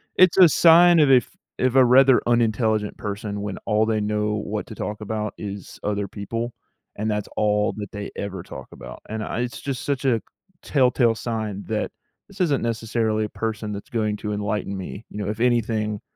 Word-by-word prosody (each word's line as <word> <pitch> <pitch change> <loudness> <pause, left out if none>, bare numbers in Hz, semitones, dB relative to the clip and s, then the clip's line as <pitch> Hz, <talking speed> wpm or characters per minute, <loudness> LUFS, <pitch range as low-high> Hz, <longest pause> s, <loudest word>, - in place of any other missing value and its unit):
it's 185 -2 +5
a 180 -3 +9
sign 170 +1 +6
of 145 -3 +5
if 125 -2 +4 0.3
if 130 0 +1
a 130 -1 +7
rather 130 +1 +6
unintelligent 110 -2 +1
person 105 0 -4
when 105 -2 -4
all 110 0 +3
they 110 -1 0
know 105 0 0
what 105 0 -4
to - - -10
talk 105 0 -4
about 105 0 -3
is 100 -2 -7
other 100 -1 -1
people, 115 +4 -4 0.4
and 110 +1 -2
that's 105 -1 -2
all 105 0 +2
that 105 -2 -6
they 100 0 -6
ever 95 -3 -5
talk - - -9
about. - - -10
And 110 0 -3
I 115 - -3
it's 125 0 -4
just 135 -3 -4
such 140 -1 -2
a 120 -4 +3 0.4
telltale 125 -4 +3
sign 110 -3 -4
that, 110 -1 -2 0.4
"This 200 -2 -8
isn't 145 -6 +1
necessarily 110 -1 -1
a 105 - -6
person 110 -2 -4
that's 100 - -8
going 105 -3 -1
to 105 0 -4
enlighten 105 -1 -2
me." 95 +3 -7
You - - -8
know? 100 - -2
"If 110 - -4
anything, 110 -3 0
110 Hz, 195 wpm, -23 LUFS, 105-120 Hz, 0.4 s, a